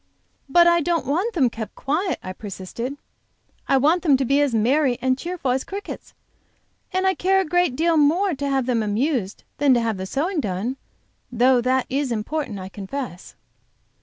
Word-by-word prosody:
"But 345 +5 +6
I 340 0 +4
don't 335 +1 0
want 370 - -1
them 275 -7 +4
kept 220 -1 -7
quiet," 330 +7 -1
I 185 - -5
persisted. 210 +7 -6 0.7
"I 270 - +4
want 310 +7 +3
them 290 -6 +4
to 265 - -1
be 275 +3 +3
as 285 -2 +2
merry 250 +3 +2
and 260 0 +1
cheerful 335 -2 -3
as 260 +1 0
crickets, 400 +1 -8 0.8
and 375 0 0
I 380 - +4
care 385 +1 +2
a 385 - 0
great 355 -4 +1
deal 330 +2 +2
more 335 +6 +3
to 280 0 -3
have 270 -2 +1
them 240 -3 +1
amused 215 0 -1 0.2
than 280 -3 +5
to - - +3
have 225 -3 -1
the 190 0 -5
sewing 325 - -1
done, 215 +3 -2 0.5
though 250 +1 +4
that 255 +1 +1
is 275 -1 -1
important, 230 +1 -3
I 185 -1 -6
confess." 195 0 -7
270 Hz, 185 wpm, -22 LUFS, 235-330 Hz, 0.8 s, But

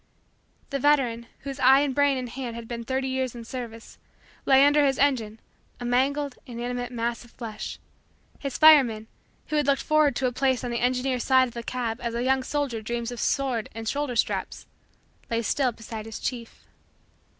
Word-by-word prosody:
The 275 - -1
veteran, 250 -5 +2
whose 275 -1 -6
eye 265 +2 +6
and 285 -2 0
brain 285 0 +3
and 255 -1 -4
hand 245 -1 -6
had 230 -1 -8
been 235 0 -5
thirty 265 +2 -1
years 260 -2 -2
in 235 -1 -8
service, 230 -2 -8 0.5
lay 270 0 +7
under 290 +1 +4
his 270 -2 +2
engine, 235 -6 +1 0.4
a 245 - -5
mangled, 275 +3 0
inanimate 245 0 -4
mass 235 0 -2
of 240 - -17
flesh; 230 -3 -7 0.6
His 275 -2 -4
fireman, 265 -9 +6 0.4
who 305 - 0
had 295 - +1
looked 275 -1 +2
forward 305 -2 +3
to 265 - -1
a 250 - +2
place 260 -1 0
on 245 - -3
the 235 - -1
engineer's 250 0 0
side 260 -1 +4
of 235 - -17
a 235 - -4
cab 235 -1 -3
as 235 -1 -3
a 235 - -1
young 265 +1 +2
soldier 265 -4 -2
dreams 235 +2 -3
of 245 - -7
sword 260 -5 0
and 225 0 -6
shoulder 280 0 -1
straps, 220 - -1 0.6
lay 230 0 0
still 255 +3 +1
beside 225 -1 -8
his 225 - -6
chief. 235 -3 -5
250 Hz, 190 wpm, -26 LUFS, 235-270 Hz, 0.6 s, lay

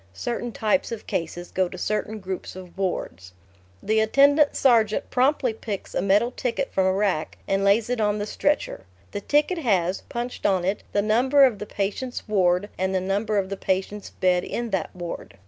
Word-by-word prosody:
(Certain 240 - -3
types 220 +5 0
of 225 -2 -6
cases 175 +1 -4
go 185 -1 0
to 185 - -9
certain 215 +3 -2
groups 190 -2 -6
of 185 -2 -11
wards.) 95 - -4 0.5
The 220 0 +2
attendant 285 +6 +4
sergeant 225 -5 +3
promptly 255 -1 +2
picks 215 -3 -6
a - - 0
metal 205 +5 +3
ticket 250 +2 -3
from 190 -1 +2
a - - +3
rack 190 -5 -1
and 195 0 +1
lays 205 +3 +3
it 245 -2 -1
on 210 0 +1
the 205 - -2
stretcher. 280 - -1 0.2
The 205 - -4
ticket 300 - +1
has, 190 - +1
punched 240 +1 -6
on 185 -3 +2
it, 195 +2 -1
the 205 - +1
number 255 +6 +4
of 230 -6 0
the 210 - -6
patient's 210 +7 -3
ward 185 -2 +2
and 190 0 0
the - - +3
number 205 +3 -1
of 190 -1 0
the 195 - -4
patient's 195 +2 -2
bed 180 -1 +1
in 235 -1 -4
that 190 - -1
ward. 175 - -7
205 Hz, 190 wpm, -24 LUFS, 190-235 Hz, 0.5 s, attendant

